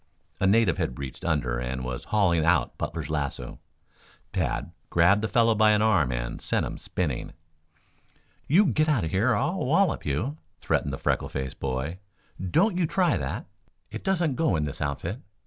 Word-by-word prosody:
A 95 Hz, -, +2 dB
native 100 Hz, -3 st, +3 dB
had 60 Hz, -, -2 dB
reached 70 Hz, -2 st, -7 dB
under 65 Hz, -8 st, 0 dB
and 65 Hz, +1 st, -3 dB
was 65 Hz, +3 st, -5 dB
hauling 95 Hz, -7 st, +2 dB
out 85 Hz, +3 st, +2 dB
Butler's 80 Hz, -1 st, -4 dB
lasso. 70 Hz, -5 st, -3 dB, 0.7 s
Tad -, -, -1 dB, 0.2 s
grabbed 90 Hz, +5 st, +4 dB
the 110 Hz, -, 0 dB
fellow 115 Hz, 0 st, +3 dB
by 110 Hz, 0 st, +5 dB
an 105 Hz, 0 st, +3 dB
arm 95 Hz, -, +3 dB
and -, -, -4 dB
sent -, -, +1 dB
him -, -, -6 dB
spinning. 75 Hz, -9 st, -3 dB, 1.1 s
"You 185 Hz, +9 st, +5 dB
get 155 Hz, -, +2 dB
out 135 Hz, -, +2 dB
of 80 Hz, -, -3 dB
here 100 Hz, +7 st, +2 dB
or 120 Hz, -, +3 dB
I'll -, -, 0 dB
wallop -, -, +2 dB
you!" 115 Hz, -, -2 dB, 0.2 s
threatened -, -, 0 dB
the -, -, -4 dB
freckle -, -, -1 dB
faced 65 Hz, -1 st, -5 dB
boy. 70 Hz, +7 st, -3 dB, 0.5 s
"Don't 180 Hz, -, +3 dB
you 170 Hz, -, +2 dB
try 180 Hz, +2 st, +2 dB
that! -, -, -3 dB, 0.5 s
It -, -, -6 dB
doesn't 175 Hz, -8 st, +1 dB
go 160 Hz, -, +2 dB
in 75 Hz, -, 0 dB
this 75 Hz, -2 st, -5 dB
outfit. 80 Hz, -, -3 dB
85 Hz, 180 wpm, -26 LUFS, 70-115 Hz, 1.1 s, by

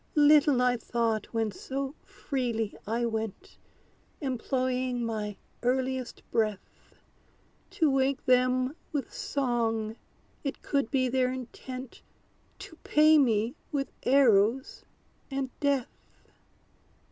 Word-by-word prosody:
Little 295 Hz, -3 st, +6 dB
I 250 Hz, 0 st, +3 dB
thought, 230 Hz, -2 st, -1 dB
when 225 Hz, -2 st, -1 dB
so 270 Hz, +7 st, -4 dB
freely 235 Hz, -6 st, -3 dB
I 235 Hz, +2 st, 0 dB
went, 225 Hz, -, -4 dB, 0.6 s
Employing 255 Hz, -2 st, -1 dB
my 210 Hz, -3 st, -3 dB, 0.2 s
earliest 255 Hz, 0 st, -1 dB
breath, 215 Hz, -3 st, -2 dB, 0.7 s
To 355 Hz, -7 st, +2 dB
wake 270 Hz, 0 st, +1 dB
them 255 Hz, +2 st, +3 dB, 0.2 s
with 285 Hz, -3 st, -3 dB
song, 230 Hz, -5 st, -1 dB, 0.5 s
it 275 Hz, -, -4 dB
could 280 Hz, -5 st, 0 dB
be 255 Hz, 0 st, +2 dB
their 255 Hz, 0 st, +1 dB
intent 255 Hz, 0 st, -7 dB, 0.6 s
To 405 Hz, -5 st, -11 dB
pay 310 Hz, 0 st, +5 dB
me 230 Hz, -3 st, +2 dB, 0.2 s
with 275 Hz, -2 st, -2 dB
arrows 250 Hz, -2 st, +3 dB, 0.5 s
and 270 Hz, -1 st, -3 dB
death! 280 Hz, -4 st, 0 dB
255 Hz, 100 wpm, -29 LUFS, 230-275 Hz, 0.7 s, Little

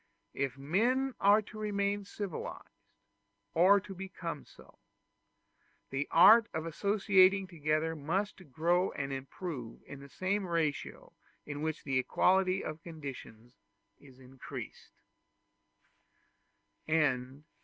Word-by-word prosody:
If 135 Hz, -1 st, -2 dB
men 240 Hz, -, +1 dB
are 205 Hz, +2 st, +5 dB
to 215 Hz, +1 st, -11 dB
remain 200 Hz, -1 st, -1 dB
civilized, 200 Hz, -3 st, -7 dB, 0.7 s
or 190 Hz, +5 st, +6 dB
to 195 Hz, 0 st, -9 dB
become 180 Hz, -4 st, -6 dB
so, -, -, -19 dB, 1.1 s
the 135 Hz, +2 st, -2 dB
art 210 Hz, +6 st, +7 dB
of 160 Hz, 0 st, -2 dB
associating 195 Hz, +2 st, +3 dB
together 160 Hz, -2 st, -1 dB
must 180 Hz, +2 st, -3 dB
grow 175 Hz, +6 st, +2 dB
and 135 Hz, -1 st, -4 dB
improve 135 Hz, -2 st, -7 dB
in 140 Hz, -, -10 dB
the 140 Hz, 0 st, -12 dB
same 190 Hz, +5 st, -2 dB
ratio 165 Hz, -4 st, -2 dB, 0.3 s
in 145 Hz, 0 st, -6 dB
which 160 Hz, 0 st, -3 dB
the 135 Hz, -2 st, 0 dB
equality 185 Hz, +8 st, +2 dB
of 155 Hz, +1 st, -6 dB
conditions 135 Hz, -8 st, -9 dB, 0.5 s
is 135 Hz, -3 st, -17 dB
increased. 130 Hz, 0 st, -10 dB
170 Hz, 105 wpm, -32 LUFS, 145-195 Hz, 1.1 s, art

